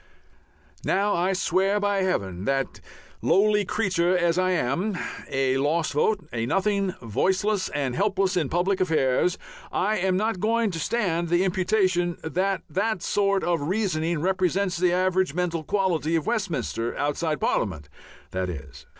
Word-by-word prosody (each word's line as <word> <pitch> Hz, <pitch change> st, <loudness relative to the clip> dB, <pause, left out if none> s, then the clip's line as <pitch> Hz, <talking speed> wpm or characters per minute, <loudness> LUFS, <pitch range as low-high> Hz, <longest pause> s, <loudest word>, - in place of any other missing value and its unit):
Now, 200 Hz, +2 st, +1 dB
I 180 Hz, +3 st, +1 dB
swear 190 Hz, +2 st, +1 dB
by 205 Hz, -1 st, +1 dB
Heaven 95 Hz, -, -1 dB
that, 135 Hz, 0 st, -1 dB, 0.4 s
lowly 210 Hz, +1 st, +3 dB
creature 185 Hz, -4 st, +1 dB
as 175 Hz, 0 st, +2 dB
I 185 Hz, 0 st, +2 dB
am, 180 Hz, -, 0 dB, 0.3 s
a 135 Hz, -1 st, +1 dB
lost 155 Hz, +4 st, 0 dB
vote, 180 Hz, +3 st, +1 dB
a 115 Hz, -1 st, -1 dB
nothing, 195 Hz, +2 st, 0 dB
voiceless 190 Hz, -, 0 dB
and 135 Hz, -4 st, -2 dB
helpless 195 Hz, -1 st, +1 dB
in 160 Hz, -7 st, 0 dB
public 185 Hz, +3 st, +1 dB
affairs, 160 Hz, -1 st, +2 dB, 0.3 s
I 215 Hz, +3 st, +1 dB
am 185 Hz, 0 st, +1 dB
not 215 Hz, -1 st, 0 dB
going 225 Hz, +1 st, +1 dB
to 165 Hz, -, -4 dB
stand 170 Hz, -3 st, 0 dB
the 175 Hz, +2 st, +3 dB
imputation 185 Hz, -2 st, +1 dB
that 185 Hz, +4 st, -1 dB
that 205 Hz, -1 st, -1 dB
sort 200 Hz, -1 st, +1 dB
of 170 Hz, -3 st, 0 dB
reasoning 170 Hz, -2 st, -1 dB
represents 185 Hz, +1 st, +1 dB
the 180 Hz, 0 st, +2 dB
average 185 Hz, -2 st, +1 dB
mental 170 Hz, -2 st, -1 dB
quality 175 Hz, -4 st, 0 dB
of 160 Hz, -, 0 dB
Westminster 150 Hz, -, -2 dB
outside 150 Hz, +1 st, -1 dB
Parliament, 80 Hz, -, -1 dB, 0.4 s
that 95 Hz, 0 st, -2 dB
is. 75 Hz, -3 st, -9 dB
180 Hz, 145 wpm, -25 LUFS, 155-195 Hz, 0.4 s, lowly